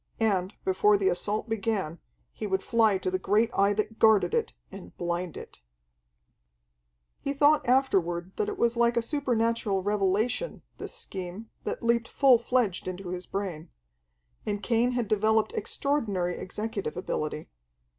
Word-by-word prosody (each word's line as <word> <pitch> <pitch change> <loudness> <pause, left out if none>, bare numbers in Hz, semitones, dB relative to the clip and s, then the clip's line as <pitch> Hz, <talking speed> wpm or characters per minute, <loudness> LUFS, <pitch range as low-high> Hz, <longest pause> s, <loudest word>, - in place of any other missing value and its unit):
And, 195 -4 +1
before 205 +2 +4
the 195 -1 +2
assault 205 +6 -1
began, 205 -7 -2 0.3
he 215 - -5
would 190 -1 -1
fly 220 -4 +3
to 185 0 -2
the 185 - 0
great 215 +5 +2
Eye 200 +1 +4
that 215 +1 -3
guarded 205 -5 +5
it, - - 0 0.2
and 90 - -11
blind 175 -1 -3
it. - - -10 1.6
He 280 - -2
thought 290 -1 +3
afterward 185 -9 +2
that 425 - 0
it 410 - -5
was 235 -5 +2
like 235 0 +2
a 235 - +2
supernatural 230 -7 0
revelation, 210 - 0 0.2
this - - -6
scheme, 195 - -7
that - - -4
leaped 235 0 +2
full 260 -4 +5
fledged 235 -7 0
into 185 0 -5
his 180 0 -5
brain. 180 -5 -4 0.7
And 205 0 -3
Cain 240 +1 +2
had 240 -3 -1
developed 220 - +2
extraordinary 230 - -1
executive 200 -4 -4
ability. 155 -4 -3
210 Hz, 145 wpm, -28 LUFS, 185-235 Hz, 1.6 s, guarded